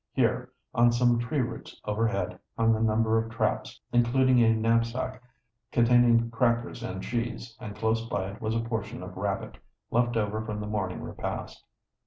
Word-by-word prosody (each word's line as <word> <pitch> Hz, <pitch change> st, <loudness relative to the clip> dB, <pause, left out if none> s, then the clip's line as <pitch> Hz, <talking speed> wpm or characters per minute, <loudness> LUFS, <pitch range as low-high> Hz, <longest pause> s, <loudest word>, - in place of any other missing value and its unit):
Here, 125 Hz, 0 st, +1 dB, 0.2 s
on 120 Hz, 0 st, +5 dB
some 120 Hz, 0 st, +3 dB
tree 125 Hz, +4 st, 0 dB
roots 120 Hz, -1 st, -6 dB
overhead, 105 Hz, -3 st, -1 dB, 0.2 s
hung 115 Hz, 0 st, +4 dB
a -, -, -2 dB
number 110 Hz, 0 st, +3 dB
of 115 Hz, 0 st, -3 dB
traps, 115 Hz, -, -1 dB
including 125 Hz, +1 st, +4 dB
a 115 Hz, -1 st, +5 dB
knapsack 115 Hz, +3 st, 0 dB, 0.5 s
containing 120 Hz, -1 st, +4 dB
crackers 120 Hz, 0 st, 0 dB
and 95 Hz, -5 st, -5 dB
cheese, 115 Hz, -1 st, -3 dB
and 105 Hz, -1 st, -7 dB
close 110 Hz, +1 st, 0 dB
by 95 Hz, -3 st, -2 dB
it 105 Hz, -, -12 dB
was 110 Hz, 0 st, -1 dB
a 115 Hz, -, +1 dB
portion 110 Hz, -2 st, -4 dB
of 90 Hz, 0 st, -8 dB
rabbit, 100 Hz, 0 st, -3 dB, 0.3 s
left 120 Hz, 0 st, +2 dB
over 110 Hz, 0 st, 0 dB
from 105 Hz, -1 st, -4 dB
the 105 Hz, -, -4 dB
morning 105 Hz, -4 st, -3 dB
repast. -, -, -5 dB
115 Hz, 165 wpm, -28 LUFS, 110-120 Hz, 0.5 s, on